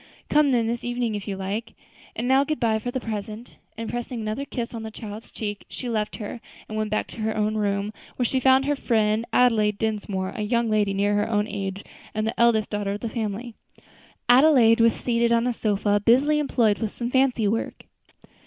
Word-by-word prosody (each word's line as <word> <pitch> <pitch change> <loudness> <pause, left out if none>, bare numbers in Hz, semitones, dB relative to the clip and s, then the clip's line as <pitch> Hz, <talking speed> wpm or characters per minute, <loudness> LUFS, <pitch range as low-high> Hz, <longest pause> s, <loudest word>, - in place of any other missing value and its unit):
"Come 295 -2 +4
then 235 -3 +2
this 235 +1 -2
evening, 245 -2 -1
if 205 0 -5
you 195 -2 -3
like; 200 +4 -4 0.4
and 235 +3 -2
now 265 +2 +5
goodbye 235 -7 0
for 245 - -4
the 260 - -2
present." 215 0 -6 0.2
And 225 0 -4
pressing 240 +1 -4
another 220 +5 -3
kiss 240 -4 -5
on 230 - -5
the 220 - -5
child's 215 0 -9
cheek, 205 -2 -5
she 250 - -6
left 215 -2 -2
her 220 +2 -6 0.3
and 215 - -7
went 215 0 -1
back 215 - 0
to - - -11
her 220 0 -1
own 215 0 +1
room, 205 -1 -1 0.2
where 245 - 0
she 260 +2 +1
found 265 +1 +4
her 290 +1 +1
friend 220 -3 +1
Adelaide 215 -4 +3
Dinsmore, 205 -4 -2
a - - -4
young 230 +1 0
lady 205 -2 +1
near 205 +1 +1
her 205 +1 +1
own 210 -1 +1
age, 195 -1 -4 0.3
and 215 0 0
the 225 - -3
eldest 230 -2 +3
daughter 205 -1 -1
of 205 - -6
the 230 - -3
family. 220 +1 -4 0.7
Adelaide 245 -3 +6
was 230 0 +5
seated 235 -1 +1
on 235 0 +3
a 250 - +1
sofa, 205 -2 +1
busily 275 +7 +4
employed 235 -8 +2
with 220 - -1
some 240 +3 -5
fancy 260 -5 +2
work. 225 +3 -2
225 Hz, 210 wpm, -24 LUFS, 210-240 Hz, 0.7 s, Adelaide